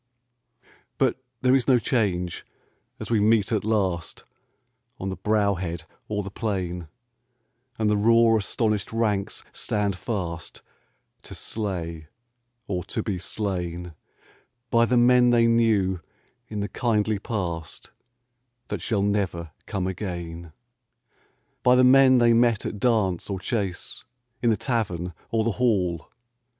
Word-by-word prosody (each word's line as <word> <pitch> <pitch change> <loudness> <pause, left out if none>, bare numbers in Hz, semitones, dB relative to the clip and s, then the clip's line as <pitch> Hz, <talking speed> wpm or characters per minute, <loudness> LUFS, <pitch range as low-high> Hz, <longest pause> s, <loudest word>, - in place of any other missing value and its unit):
But - - +1 0.2
there 130 0 +5
is 130 - +1
no 130 -2 +6
change 95 -8 -1 0.6
as - - -6
we 115 - +3
meet 105 -1 +3
at 110 -3 +1
last 95 -6 -1 0.8
On 95 - -3
the 95 - -3
brow 105 -1 +2
head 85 -2 -4 0.2
or 105 -1 -2
the 100 - -7
plain, 90 -6 -3 0.9
And 110 - +1
the 105 - +3
raw 115 +2 +5
astonished 105 -1 -1
ranks 105 -3 -1
stand 100 -2 -1
fast 90 -6 -5 0.6
To - - -10
slay 85 -7 -4 0.6
or 90 -5 -2
to 110 - -3
be 100 -4 -2
slain 90 -3 -4 0.8
By 115 0 +5
the 125 +1 +2
men 125 0 +5
they 120 -1 +4
knew 110 -6 +2 0.5
in 105 -1 -4
the 100 - -3
kindly 110 -3 0
past 90 -7 -4 0.8
That - - -3
shall 105 -4 0
never 95 -6 -1 0.2
come 95 -4 -2
again 85 -3 -5 0.5
— 115 - -41
By 125 0 +5
the 130 - +5
men 130 0 +7
they 120 -1 +5
met 115 -2 +3
at 105 - -4
dance 105 -7 +1
or 95 -2 -2
chase, 95 -3 -3 0.4
In 120 - +3
the 110 - +2
tavern 90 -8 -2 0.2
or 115 -1 +1
the 115 - +1
hall. 90 -9 +1
105 Hz, 135 wpm, -25 LUFS, 90-115 Hz, 0.9 s, men